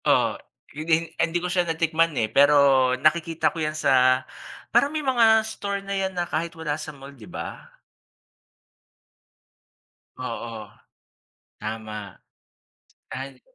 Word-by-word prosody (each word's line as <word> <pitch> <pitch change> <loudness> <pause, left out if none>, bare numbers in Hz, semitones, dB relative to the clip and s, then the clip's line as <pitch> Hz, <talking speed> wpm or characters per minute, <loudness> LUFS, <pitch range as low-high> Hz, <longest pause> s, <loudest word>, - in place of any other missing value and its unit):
Oo, - - +3 0.4
yun 155 +2 -6
di - - +4 0.3
hindi 170 +1 +1
ko 175 - -4
siya 180 - +3
natikman, 165 0 +2
eh, 110 - +2
pero 145 +1 +6 0.4
nakikita 165 +5 +1
ko - - -9
yan 155 0 -2
sa 130 -3 +3 0.5
parang 280 - +4
may 305 -1 -4
mga 225 -4 +4
store 200 -2 -4
na 200 - -4
yan 190 -1 -2
na 175 - 0
kahit 170 +1 -3
wala 160 -2 -2
sa 155 - -6
mall, 140 -1 -11
'di 120 -6 -14
ba? - - -7 2.5
Oo. 115 -2 -6 0.9
Tama. 105 -2 -6 1.0
Al 130 0 -7
160 Hz, 130 wpm, -24 LUFS, 130-185 Hz, 2.5 s, pero